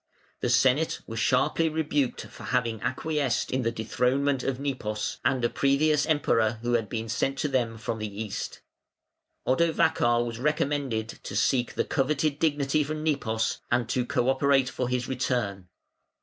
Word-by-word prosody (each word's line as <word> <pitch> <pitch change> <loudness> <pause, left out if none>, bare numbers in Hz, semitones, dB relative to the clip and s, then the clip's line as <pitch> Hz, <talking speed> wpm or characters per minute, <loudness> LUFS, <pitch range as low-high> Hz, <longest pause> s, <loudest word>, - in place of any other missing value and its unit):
The 125 - -1
Senate 130 +6 +3
were 115 - -7
sharply 130 +9 +2
rebuked 150 -4 -1
for - - -11
having 115 -4 0
acquiesced 150 -5 -1
in 130 - +1
the 115 -1 0
dethronement 125 +5 0
of 135 -1 -2
Nepos, 105 -7 -3
and 130 -3 +1
a - - +5
previous 140 +3 +2
Emperor 115 -7 +2
who 120 0 0
had 115 -3 +1
been 115 -1 -3
sent 135 +5 -1
to 150 - 0
them 120 -5 0
from 110 0 -4
the 110 0 -3
East. 105 - -5 0.8
Odovacar 125 -5 +2
was 115 -1 -5
recommended 140 -5 0
to 100 - -7
seek 120 +4 +1
the - - 0
coveted 145 +1 0
dignity 150 -1 +2
from 155 +1 -4
Nepos, 115 -8 0
and 120 -1 +1
to 125 +1 +1
co 125 0 0
operate 135 -1 +3
for 125 -1 -2
his 125 -1 -1
return. 120 -8 -2
130 Hz, 160 wpm, -27 LUFS, 115-145 Hz, 0.8 s, a